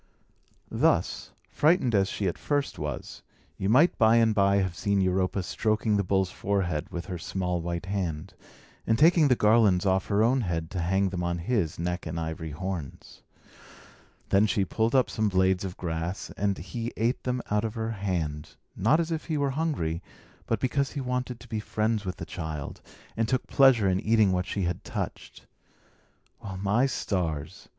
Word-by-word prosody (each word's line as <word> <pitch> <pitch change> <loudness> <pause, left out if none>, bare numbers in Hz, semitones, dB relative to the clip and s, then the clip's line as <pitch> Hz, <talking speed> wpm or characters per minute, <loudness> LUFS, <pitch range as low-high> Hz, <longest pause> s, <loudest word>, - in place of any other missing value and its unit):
Thus, - - +1 0.2
frightened 150 -6 +2
as 100 -2 +3
she 100 - -2
at 90 - -3
first 145 -1 -1
was, - - -5 0.4
you 95 - 0
might 145 +10 +4
by 110 0 +6
and 115 -1 +4
by 100 -1 +3
have 95 -3 0
seen 100 +2 0
Europa 95 0 +1
stroking 110 +3 0
the 100 - +2
bull's 95 0 +1
forehead 95 -6 -1
with 85 -1 -5
her 90 -3 -5
small 90 0 -2
white 85 +1 -4
hand, 95 -3 -3 0.5
and 110 - +3
taking 160 +2 +5
the 125 - +4
garlands 105 -4 +4
off 95 0 +1
her 105 +1 +2
own 125 +3 +3
head 85 -5 -3
to 95 - -3
hang 95 +3 +1
them 90 -1 -4
on 85 0 -1
his 85 -3 -1
neck 90 +1 -3
and 80 +1 -3
ivory 80 0 -4
horns. 85 -1 -6 1.1
Then 100 +2 +4
she 100 0 +1
pulled 110 +6 0
up 130 -2 +4
some 110 -1 0
blades 95 -1 +2
of 95 -2 -5
grass, 85 +1 -4
and 100 -1 0
he 115 +7 -5
ate 115 +3 0
them 125 0 -1
out 105 +1 +2
of 110 0 -3
her 110 0 -2
hand, 85 -8 -3 0.2
not 115 - +3
as 165 0 -1
if 160 -1 -3
he 160 -3 -1
were 140 -1 +1
hungry, 130 - -1 0.5
but 115 - 0
because 135 +2 0
he 145 - -3
wanted 125 -2 -3
to 120 - -13
be 110 -1 -3
friends 110 0 -1
with 90 - -3
the - - -6
child, 80 -4 -6 0.3
and 115 0 0
took 130 +1 0
pleasure 130 -7 +5
in 95 0 +2
eating 110 -1 +3
what 90 0 -1
she 100 - -2
had 85 0 -2
touched. - - -6 1.0
Well, 95 -1 -6
my 105 +7 +2
stars! 85 - -3
100 Hz, 185 wpm, -27 LUFS, 90-115 Hz, 1.1 s, by